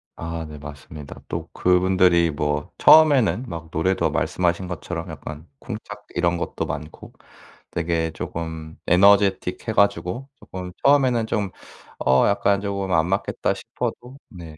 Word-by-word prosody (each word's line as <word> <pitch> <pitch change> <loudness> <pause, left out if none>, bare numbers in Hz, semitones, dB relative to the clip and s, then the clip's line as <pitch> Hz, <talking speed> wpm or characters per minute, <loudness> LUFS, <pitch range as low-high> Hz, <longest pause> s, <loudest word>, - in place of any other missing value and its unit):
아 85 0 -5
네 75 - -9
맞습니다. 75 0 -10
또 - - -4
그분들이 90 -2 +3
뭐 75 +4 -2
처음에는 140 -7 +6
막 80 -3 -7
노래도 95 +4 +1
말씀하신 90 +1 0
것처럼 90 - -5
약간 75 +2 -8
쿵짝 105 -3 -8
이런 85 0 +1
것도 - - -3
많고 75 +2 -7 0.6
되게 85 -1 -1
쪼금 80 -1 -6
에너제틱해 100 +2 +3
가지고 100 +5 +1
쪼끔 90 -1 -8
처음에는 130 -5 +4
좀 105 -4 -1 0.5
'어 65 0 +4
약간 100 0 +2
쪼금 100 -2 -3
안 80 0 +3
맞겠다.' 95 +2 -1
싶어도 130 +3 -6
네. 85 -7 -11
90 Hz, 285 characters per minute, -23 LUFS, 80-100 Hz, 0.6 s, 처음에는